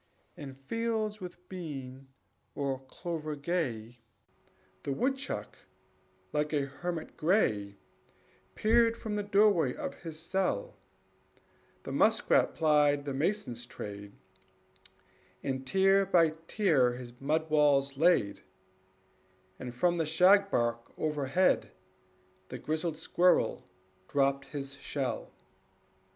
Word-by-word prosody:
In 135 -2 -8
fields 215 +7 -2
with 180 0 -9
bean 135 -7 -7 0.5
or 135 -2 -2
clover 155 0 -5
gay, 125 -8 -3 0.8
The 140 - -3
woodchuck, 255 - -2 0.8
like 150 0 0
a 145 -2 +1
hermit 160 +4 -5
gray, 105 - +1 0.8
Peered 230 +1 +3
from 215 -2 -4
the 205 - 0
doorway 200 -9 +3
of - - -6
his 160 -2 -7
cell; 195 - -1 1.1
The - - -6
muskrat - - +3
plied 150 -2 +3
the 140 - -3
mason's 135 - -2
trade, 100 -4 -8 1.3
And 130 -1 -3
tier 195 0 +4
by 165 -4 +4
tier 150 - +3
his 125 0 -10
mud 155 +3 0
walls 140 -2 +3
laid; 155 - +3 1.2
And 125 - -5
from 175 +8 +1
the 160 - 0
shagbark 160 - +3
overhead 150 +3 +1 0.8
The 125 - -5
grizzled 155 +3 -2
squirrel 170 - +2 0.4
dropped 140 -1 +1
his 140 -1 -6
shell. 135 -2 -3
150 Hz, 105 wpm, -31 LUFS, 135-180 Hz, 1.3 s, tier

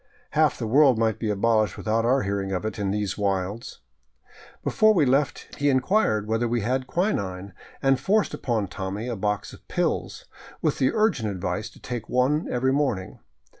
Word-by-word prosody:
Half - - +2
the - - -3
world 130 +2 +5
might 110 -1 +1
be 110 - -2
abolished 110 -1 +1
without 110 +1 0
our 130 +3 +3
hearing 100 -1 -2
of 95 +2 -2
it 110 - -4
in 100 -1 -1
these 100 -1 -2
wilds. 100 +2 -2 0.8
Before 215 0 +4
we 160 -5 +4
left 135 +1 0
he 145 0 +3
inquired 130 - +2
whether 115 +2 0
we 120 0 0
had 130 +4 -1
quinine, 100 - -2 0.3
and 135 -1 +3
forced 205 +9 +1
upon 110 -5 -1
Tommy 95 +4 -5
a 120 - -2
box 105 0 -2
of - - -16
pills, - - -2 0.3
with - - 0
•the 130 - +3
urgent 200 - +1
advice 95 +2 -3
to - - -18
take 120 -3 -6
one 135 +6 +1
every 130 +2 +1
morning. 130 -10 -1
115 Hz, 175 wpm, -25 LUFS, 100-135 Hz, 0.8 s, world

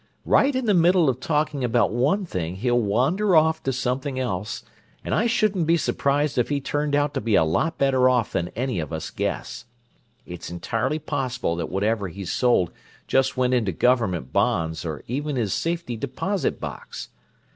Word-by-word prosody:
Right 275 0 +3
in 260 -1 -1
the 210 - +3
middle 175 -2 +4
of 125 - -8
talking 150 +1 -1
about 120 -2 +2
one 145 - +1
thing 90 - -4
he'll 120 +4 +1
wander 140 - +2
off 160 0 +4
to 135 - -1
something 130 +1 -2
else; 105 -4 -3 0.4
and - - -2
I 230 - +2
shouldn't 210 -7 +1
be 170 +1 +4
surprised 145 -2 0
if 120 - +1
he 145 -1 0
turned 145 +1 -1
out 145 0 +1
to - - -2
be 110 -1 +1
a - - +5
lot 155 - 0
better 130 -2 +3
off 125 -3 +1
than 85 - -1
any 125 -5 -1
of 80 - -4
us 80 -1 -5
guess. - - -4 0.6
It's 90 0 -8
entirely 115 - -2
possible 130 - -2
that 85 - -3
whatever 100 +2 0
he's 95 +1 -6
sold 120 -9 +2 0.3
just 135 0 +1
went 130 0 +2
into 115 -6 +1
government 95 - +1
bonds, 90 -7 0
or 80 -3 -5
even 145 +4 -3
his 110 -6 0
safety 165 -7 -2
deposit 140 - -2
box. - - -7
125 Hz, 180 wpm, -24 LUFS, 105-150 Hz, 0.6 s, a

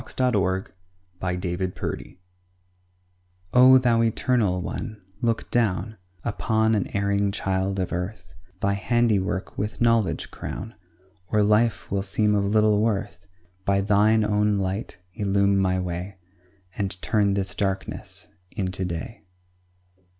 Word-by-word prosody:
LOVE - - -7
BETTER 100 -7 +1 0.5
THAN 90 -1 -2 0.4
KNOWLEDGE - - -5 1.4
O 130 +1 +8
Thou 120 -3 +3
Eternal 115 -4 +1
One, 110 +2 -5 0.2
look 115 -1 -1
down 110 -2 0 0.3
Upon 110 -1 +1
an 105 -3 +1
erring 100 0 +1
child 95 -1 -1
of 90 -1 -2
earth; 90 0 -5 0.3
Thy 100 0 +2
handiwork 100 -3 0
with 105 +2 -3
knowledge 115 -3 +1
crown, 115 - -6 0.5
Or 105 +3 +2
life 105 -4 +2
will 100 0 +1
seem 105 +2 +1
of 100 -1 +2
little 105 0 +3
worth; 100 -4 -2 0.4
By 100 0 +2
Thine 105 +2 +3
own 105 0 +2
light 95 +2 -3 0.2
illume 100 0 +2
my 95 -1 +2
way, 90 +2 -4 0.6
And 95 -3 -3
turn 100 -2 +2
this 95 -2 -1
darkness 95 -1 -4 0.3
into 95 -3 -3
day. 90 +5 -5
100 Hz, 120 wpm, -25 LUFS, 95-110 Hz, 1.4 s, O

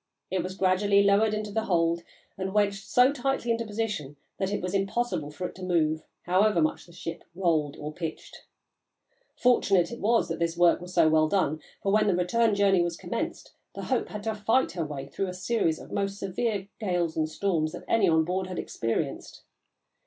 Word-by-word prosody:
It 185 -1 +1
was 185 +2 -5
gradually 200 +1 +3
lowered 205 +2 +3
into 210 -1 -4
the 220 +2 -1
hold 170 -2 +1 0.3
and 190 +1 -4
wedged 200 -1 +1
so 250 +3 +4
tightly 270 -3 -1
into 230 0 -1
position 205 -10 -3 0.2
that 190 0 -1
it 205 - -1
was 180 +1 -4
impossible 195 -5 -1
for 180 +5 -6
it - - -11
to 185 - -8
move, 160 -3 +1 0.2
however 190 +2 +3
much 155 +2 0
the - - -15
ship 165 -1 -7
rolled 160 -6 +1
or 150 +1 -6
pitched. 160 -1 -7 0.9
Fortunate 200 -7 +3
it 235 - -7
was 230 +3 +2
this 170 0 -2
work 175 -1 +4
was 180 0 -8
so 170 -3 +4
well 155 0 +4
done, 155 -4 0 0.2
for 195 - +1
when 215 +1 +3
the 195 - +3
return 210 +5 +2
journey 195 -2 +4
was 170 -1 -1
commenced - - -4 0.2
the - - -5
Hope 260 - 0
had 210 -1 -6
to 220 0 -1
fight 225 +5 +1
her 170 - -3
way 140 -2 -6
through 195 +7 -3
a 180 - -5
series 185 -4 0
of - - -12
the - - -10
most 200 0 -1
severe 200 +1 -2
gales 175 -6 -1
and 155 -1 0
storms 160 -3 0
that - - -8
any 215 -5 +3
on 160 -1 +3
board 185 +2 -2
had 185 - -6
experienced. 115 0 -3
190 Hz, 200 wpm, -27 LUFS, 170-210 Hz, 0.9 s, so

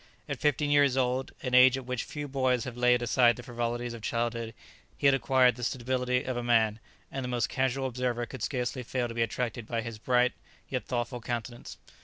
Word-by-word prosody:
At - - -4
fifteen 150 0 +1
years 140 -2 +4
old, 130 0 0
an 125 -1 -3
age 130 +1 +7
at 130 - -7
which 125 -1 -3
few 145 -1 -6
boys 130 -3 +1
have 125 -2 -6
laid 125 0 +3
aside 120 0 +4
the 125 - -10
frivolities 120 -1 -3
of 115 - -8
childhood, 115 0 -2 0.4
he - - -3
had 140 - +7
acquired 125 -1 +3
the 120 - -7
stability 125 0 0
of 130 - -3
a 120 - -2
man, 115 -2 +2 0.3
and 135 - -4
the - - -3
most 120 -3 0
casual 130 0 0
observer 125 -1 -1
could 130 +2 -9
scarcely 125 -1 -2
fail 125 0 -2
to 115 - -7
be 115 - -1
attracted 115 0 -2
by 115 -1 -1
his 115 -1 -7
bright, 125 +1 +2 0.4
yet 130 -2 -3
thoughtful 120 0 -3
countenance. 120 0 -5
125 Hz, 210 wpm, -29 LUFS, 120-130 Hz, 0.4 s, age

